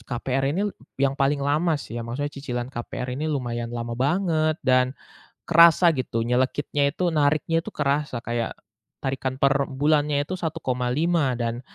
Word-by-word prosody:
KPR 130 +4 -2
ini 205 +3 0 0.3
yang 135 -1 +3
paling 140 +1 +2
lama 155 +4 +2
sih 120 - -8
ya, 115 - -4
maksudnya 145 +5 -3
cicilan 125 -3 -4
KPR 125 +1 -5
ini 155 - -1
lumayan 120 -4 -2
lama 120 0 -4
banget 155 +1 +1
dan 130 0 +3 0.5
kerasa, 170 +1 +7
gitu. 115 -3 -2
Nyelekitnya 135 +3 +1
itu, 180 - +1
nariknya 155 +2 +2
itu - - -6
kerasa. 145 -3 -1
Kayak 120 -1 -2 0.5
tarikan 130 -1 -2
per 140 0 +3
bulannya 145 +1 +1
itu 150 - -7
1,5. 150 -2 0
Dan, 120 0 -2
140 Hz, 150 wpm, -24 LUFS, 125-155 Hz, 0.5 s, kerasa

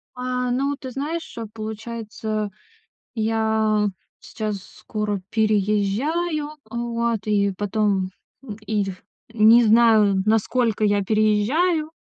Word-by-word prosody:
А, 250 0 -2
ну 275 +3 0
ты 260 - -7
знаешь, 300 +3 -5 0.2
получается, 220 -1 -4 0.7
я 220 -1 +1 0.3
сейчас 215 -2 -4
скоро 210 -1 -4
переезжаю, 220 - 0 0.2
вот, 235 -1 -1
и 200 -2 +2
потом, 205 -2 0 0.6
и 210 0 0
ф 190 -2 -7 0.3
не 225 +2 +6
знаю, 215 -4 +5
насколько 225 +1 +1
я 205 -1 +2
переезжаю, 235 - +2
220 Hz, 95 wpm, -23 LUFS, 210-240 Hz, 0.7 s, не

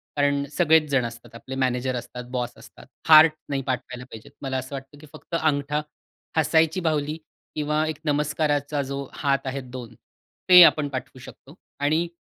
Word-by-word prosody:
कारण 140 -1 +1
सगळेच 160 -3 +4
जण 135 -4 +1
असतात. 115 0 -10
आपले 130 +3 -8
मॅनेजर 130 -1 -1
असतात, 125 0 -7
बॉस 125 -2 -2
असतात. - - -15 0.2
हार्ट 155 0 +8 0.2
नाही 135 -1 -1
पाठवायला 125 0 -4
पाहिजे. 110 -4 -12
मला 135 -1 -2
असं 130 +2 -5
वाटतं 135 +2 -10
की 155 - -13
फक्त - - -7
अंगठा, 150 -1 0 0.6
हसायची 160 +2 +3
बाहुली 155 -2 -1 0.4
किंवा 150 +1 0
एक 155 - -3
नमस्काराचा 145 -1 0
जो 140 +1 -4
हात 140 -2 -1
आहे 135 +1 -3
2 125 -2 -9 0.6
ते 180 -1 +10
आपण 150 -3 +4
पाठवू 130 -1 -7
शकतो 140 +4 -14 0.2
आणि 155 +4 +1
140 Hz, 160 wpm, -24 LUFS, 130-155 Hz, 0.6 s, ते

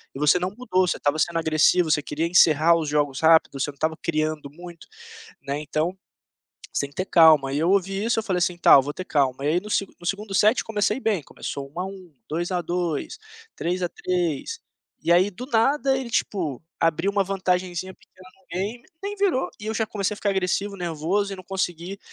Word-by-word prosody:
e - - -6
você 150 +4 +4
não 180 +1 -1
mudou, 185 -7 +1
você - - 0
estava 145 +2 0
sendo 170 +1 +1
agressivo, 160 +1 +3
você 150 - +3
queria 150 +3 -3
encerrar 170 -2 +5
os 155 -3 -2
jogos 145 -2 0
rápido, 160 -3 +4
você 135 - 0
não 145 - -9
estava 160 +3 -1
criando 155 -2 -2
muito, 175 +2 -12 0.6
né, 140 +1 -3
então, 155 +4 -2 0.8
você 140 - 0
tem - - -19
que - - -24
ter 185 - -1
calma". 155 -6 +5
E 145 - 0
eu 165 +3 +1
ouvi 195 +1 +1
isso 230 - +1
eu - - -3
falei 185 -4 -1
assim: 180 0 0
"Tá, 170 - +7
vou 140 +2 -2
ter 185 - -7
calma", 135 -3 0
e - - +2
aí 170 +3 +2
no 210 - -10
segu 195 -2 -1
no 175 - -13
2º 200 +2 -3
set 215 +5 +3
comecei 215 +2 0
bem, 215 -8 0
começou 140 +1 -7
1 170 - -7
a 185 - -1
1, 190 -3 -10 0.2
2 170 +4 -2
a 180 -1 0
2, 175 - -3 0.4
3 180 +2 -2
a 175 - 0
3, 180 - -2 0.4
e - - +1
aí 180 +3 +5
do 235 +7 -8
nada, 270 +3 +2
ele 260 -2 -5
tipo, 170 - -2 0.2
abriu 165 +4 +1
uma 200 -1 +2
vantagenzinha 185 -1 -2
pequena 185 0 -19
no 190 - -30
game, 215 +6 -4 0.2
nem 405 +1 -3
virou 390 -10 +1
e 210 - -7
eu 220 - -1
já 220 - 0
comecei 205 -1 -2
a - - -13
ficar 205 - -1
agressivo, 195 +1 -1
nervoso 175 +4 -1
e - - -5
não 185 - -11
consegui 185 0 -4
180 Hz, 220 wpm, -24 LUFS, 155-200 Hz, 0.8 s, Tá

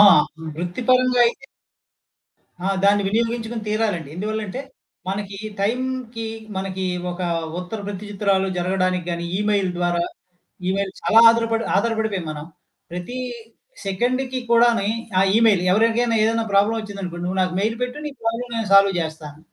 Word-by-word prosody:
ఆ! - - +11 0.5
వృత్తి 175 +6 -4
పరంగా 255 -1 +4
అయితే 255 +3 -3 1.2
ఆ! 195 - +1 0.2
దాన్ని 205 0 +5
వినియోగించుకుని 230 +1 -1
తీరాలండి. 210 -8 -1
ఎందువల్లంటే 215 +4 -3 0.5
మనకి 200 0 -3 0.2
టైమ్‌కి 245 +1 -2 0.3
మనకి 190 0 -3 0.3
ఒక 175 +1 -7 0.4
ఉత్తర 180 +5 -6
ప్రతిచిత్రాలు 200 -1 -1
జరగడానికి 185 0 0
గాని 170 0 -3
ఇమెయిల్ 205 -2 +1
ద్వారా 175 -1 +1 0.7
ఇమెయిల్ 195 0 -1
చాలా 225 - +5
ఆధారపడి 230 0 +1
ఆధారపడిపోయాం 220 -4 0
మనం. 150 0 -7 0.5
ప్రతీ 180 +8 -5 0.7
సెకండ్‌కి 255 +6 0
కూడాని 235 -3 +4 0.3
ఆహ్, 195 0 +4
ఇమెయిల్ 220 -5 +5
ఎవరికైనా 230 +3 +3
ఏదైనా 225 +1 +2
ప్రాబ్లమ్ 205 +3 +3
వచ్చిందనుకోండి, 195 -4 -6
"నువ్వు 190 +1 -1
నాకు 185 -1 0
మెయిల్ 225 +2 0
పెట్టు. 250 +4 -3
నీ - - -6
ప్రాబ్లమ్ 235 +2 -2
నేను 225 -3 -2
సాల్వ్ 195 0 +7
చేస్తాను." 155 -2 -7
205 Hz, 130 wpm, -22 LUFS, 190-230 Hz, 1.2 s, ఆ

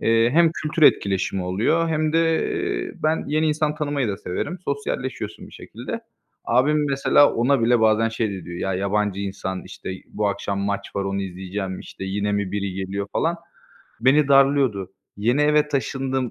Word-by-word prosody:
Eee, 115 +1 +3
hem 165 +4 +5
kültür 155 +1 -3
etkileşimi 95 -7 +3
oluyor 110 - +1
hem 155 -1 0
de 165 - +4 0.8
ben 155 +1 +1
yeni 155 +2 +1
insan 150 0 0
tanımayı 145 -5 -1
da 100 - -2
severim, 105 - -4
sosyalleşiyorsun 140 -2 -4
bir - - -16
şekilde. - - -7 0.4
Abim 145 +5 +2
mesela 140 +1 +4
ona 125 +3 +2
bile 120 0 +4
bazen 110 0 +3
şey 115 -1 -2
de 95 -3 -7
diyor: 85 +1 -7
"Ya, 95 -1 -1
yabancı 100 +1 0
insan, 95 -1 -4
işte, 95 0 -8 0.2
bu 105 -1 -1
akşam 100 0 -2
maç 100 0 -3
var 100 - 0
onu 100 0 -2
izleyeceğim, 95 +1 -5
işte, - - -9
yine 100 +2 -1
mi 100 -2 -1
biri 100 -1 -2
geliyor" 95 +1 -3
falan. 170 +1 0 0.6
Beni 135 +4 +4
darlıyordu. 135 -9 +3 0.2
Yeni 120 +8 +2
eve 150 0 +3
taşındım. 135 -2 -1
115 Hz, 165 wpm, -23 LUFS, 100-145 Hz, 0.8 s, hem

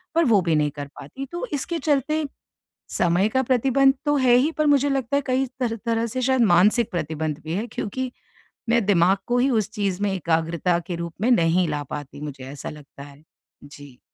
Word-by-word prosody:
पर 335 0 +4
वो 215 -5 +4
भी 170 -3 +1
नहीं 150 -1 +1
कर 145 -1 -6
पाती। 265 - -8
तो 345 +7 -4
इसके 330 +4 -2
चलते 305 +1 0 0.7
समय 175 +4 +3
का 260 +3 +1
प्रतिबंध 270 +2 +3
तो 290 - +3
है 255 -3 +4
ही 270 +6 +3
पर 305 - +2
मुझे 285 -1 +4
लगता 270 -1 0
है 285 - +1
कई 260 +1 +1
तर 235 -3 -1
तरह 230 0 +1
से 255 +3 -4
शायद 260 0 +2
मानसिक 210 +6 +3
प्रतिबंध 155 -3 -3
भी 160 - -4
है। 210 +5 -2
क्योंकि 255 +5 -3 0.6
मैं 235 -2 +3
दिमाग 190 -1 +4
को 245 0 +1
ही 265 +2 +3
उस 220 -4 +1
चीज़ 200 -3 -2
में 205 - +1
एकाग्रता 170 0 0
के 175 - -3
रूप 170 0 -5
में 230 - +2
नहीं 175 -3 +3
ला 145 -1 -2
पाती 145 -1 -7
मुझे 145 -3 -7
ऐसा 140 - -7
लगता 145 -2 -12
है। 145 +1 -15 0.4
जी। 145 -3 -13
205 Hz, 205 wpm, -23 LUFS, 160-260 Hz, 0.7 s, पर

